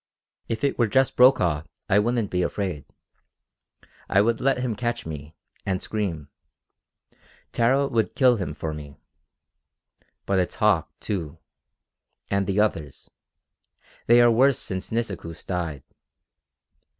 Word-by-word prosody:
"If 115 -1 -3
it 140 - 0
were 120 - +4
just 130 +5 +2
Brokaw 95 - +4 0.3
I 100 - +4
wouldn't 115 -1 0
be 90 - 0
afraid. 90 -4 -3 1.2
I 95 - +4
would 115 +2 +2
let 135 0 +2
him 125 -3 -2
catch 120 +2 -3
me, 75 0 -8 0.3
and 95 -1 -1
scream. 90 -11 -3 1.2
Tara 130 +4 +2
would 115 -4 -1
kill 125 -3 +4
him 90 -7 -4
for 80 0 -4
me. 75 -2 -9 1.3
But 100 -1 +1
it's 90 - -1
Hauck, 105 -6 +2
too. 85 -8 -4 0.9
And 100 -1 +1
the 100 +1 0
others. 80 -10 -2 1.0
They 120 +1 +7
are 120 - +6
worse 130 +3 +4
since 95 -1 -5
Nisikoos 100 -8 -4
died. 85 -7 -3
100 Hz, 125 wpm, -24 LUFS, 85-120 Hz, 1.3 s, They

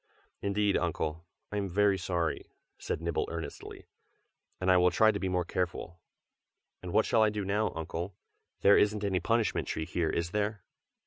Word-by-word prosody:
"Indeed, 100 0 +1
Uncle, 80 -1 -2 0.2
I 105 - -2
am 100 -1 -1
very 100 +1 +3
sorry!" 85 -1 -2 0.3
said - - -3
Nibble 85 -1 -1
earnestly; 80 -3 -7 0.7
"and 90 0 +2
I 90 - +6
will 90 0 +5
try 110 +4 +4
to 100 - -3
be 95 - -1
more 90 -1 0
careful. 85 -1 -3 0.8
And 90 - -8
and - - -6
what 110 - +4
shall 115 - +3
I 110 - +5
do 105 -1 -3
now, 105 +3 +1
Uncle? 85 +3 -4 0.5
there 100 - +7
isn't 105 0 +2
any 95 -2 +1
punishment 115 +5 0
tree 80 - -2
here, 85 0 -1
is 85 0 -1
there?" 105 -1 -1
95 Hz, 180 wpm, -30 LUFS, 85-105 Hz, 0.8 s, there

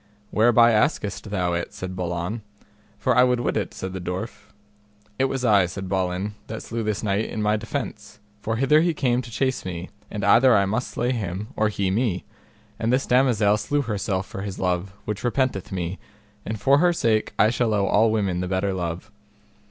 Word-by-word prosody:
Whereby 120 +1 +5
askest 110 -3 0
thou 90 -3 0
it? 85 0 -3
said 95 0 -5
Balan. 90 +4 -3 0.6
For 125 -2 +1
I 125 - +6
would 125 -1 +2
wit 120 - -1
it, - - -1
said 95 0 -6
the 95 - -5
dwarf. 95 +4 -5 0.7
It 135 - +4
was 135 -1 -2
I, 100 -5 +5
said 95 +1 -6
Balin, 95 +2 -1
that 110 - -6
slew 115 0 -4
this 110 -1 -2
knight 105 +1 +1
in - - -5
my 105 0 +2
defence, 110 -1 -5 0.2
for 110 +2 -1
hither 135 +6 +4
he 170 -1 +1
came 125 -3 +1
to 125 - -10
chase 130 +3 -1
me, 90 0 -6 0.2
and 105 -2 -5
either 120 +1 +6
I 100 -1 +4
must 110 +6 -1
slay 125 - -1
him 105 -3 -3
or 110 0 +2
he 100 -3 -1
me; 105 -3 0 0.5
and 115 +1 0
this 130 +2 +2
damosel 120 -5 +3
slew 145 +8 0
herself 100 -4 -2
for 95 - -7
his 100 -2 -5
love, 90 +1 -1
which 105 -1 -4
repenteth 125 -5 0
me, 90 0 -3 0.5
and 110 -1 -3
for 135 +7 +4
her 175 +1 +4
sake 110 -9 +1
I 110 - +5
shall 120 -2 0
owe 100 -2 +2
all 110 +3 +4
women 100 -5 0
the 90 - -2
better 95 +1 0
love. 90 +3 -4
105 Hz, 200 wpm, -24 LUFS, 95-120 Hz, 0.7 s, I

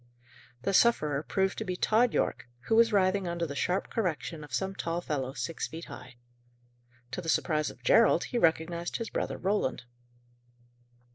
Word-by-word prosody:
The 195 - 0
sufferer 155 -11 +3
proved 190 +4 -1
to - - -2
be 185 -3 -3
Tod 225 +5 +3
Yorke, - - -1
who 220 - 0
was 230 0 +5
writhing 190 -1 +2
under 170 0 -2
the 140 -3 -6
sharp 180 +6 -1
correction 165 -6 -2
of 145 - -12
some 190 +11 -1
tall 170 -3 -2
fellow, 135 -6 -3
six 165 +3 -3
feet 165 +1 -8
high. 125 0 -11 1.0
To - - -4
the 165 - -5
surprise 155 -1 +1
of - - -14
Gerald, - - +5
he 245 - -2
recognized 170 -1 +1
his 230 -2 -5
brother - - -2
Roland. 190 - -1
175 Hz, 165 wpm, -29 LUFS, 155-200 Hz, 1.0 s, was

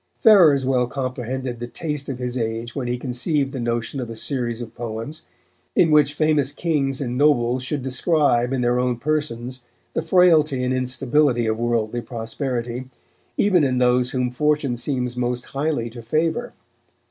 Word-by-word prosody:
Ferrers 170 - +6
well 125 -2 +2
comprehended 130 -1 -4
the 120 - -5
taste 150 +1 -4
of 135 - -3
his 125 -1 -4
age 115 0 -3
when 130 -3 -3
he 125 0 -1
conceived 135 +3 -1
the 135 - -5
notion 120 +3 -2
of 120 -3 -4
a 115 - -6
series 120 -1 -2
of 120 -2 -7
poems, 115 +6 -6 0.5
in 165 -3 +4
which 145 -1 +4
famous 150 -3 +2
kings 145 -4 -1
and 125 -1 -2
nobles 130 -4 +3
should 130 +1 -3
describe 130 -2 +2
in 135 -2 0
their 120 +1 +2
own 125 -1 0
persons 130 -3 -2 0.3
the - - 0
frailty 160 -5 +4
and 125 0 0
instability 130 0 +1
of 110 0 -1
worldly 120 0 0
prosperity, 120 +1 -4 0.5
even 190 -6 +4
in 130 -2 +1
those 125 0 +3
whom 125 -1 -1
Fortune 150 -1 +1
seems 125 -1 -2
most 125 0 -2
highly 140 -4 -2
to 120 0 -9
favour. 160 - -1
130 Hz, 165 wpm, -22 LUFS, 120-145 Hz, 0.5 s, Ferrers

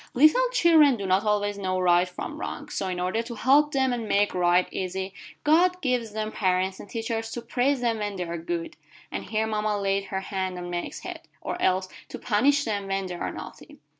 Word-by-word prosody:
"Little 310 - +5
children 315 - +5
do 200 - -4
not 190 +2 +2
always 205 -1 0
know 185 -1 -1
right 180 0 +3
from 180 - -6
wrong, - - -5
so 195 - -2
in 180 -1 -3
order 185 +5 0
to 235 0 -7
help 280 +6 +4
them 265 -2 +1
and 230 -2 -3
make 205 0 +2
right 180 0 +3
easy, 190 +1 -3 0.3
God 355 +4 +4
gives 250 -7 -1
them 215 0 -3
parents 185 -1 0
and 205 - -10
teachers 225 -1 -3
to 240 - -4
praise 260 +1 +1
them 230 -2 0
when 205 -1 -3
they 180 - -2
are 170 -1 -4
good" 170 0 -4 0.3
and - - -4
here 220 +1 0
mama 215 -1 -1
laid 195 0 0
her 190 0 -3
hand 190 -1 -3
on 175 0 -6
Meg's 175 0 -4
head - - -7 0.2
"or - - -5
else 185 0 +2 0.2
to - - -6
punish 275 +6 +2
them 205 -4 -2
when 195 0 -1
they 180 - -5
are 175 - -3
naughty. - - -10
205 Hz, 215 wpm, -26 LUFS, 185-240 Hz, 0.3 s, Little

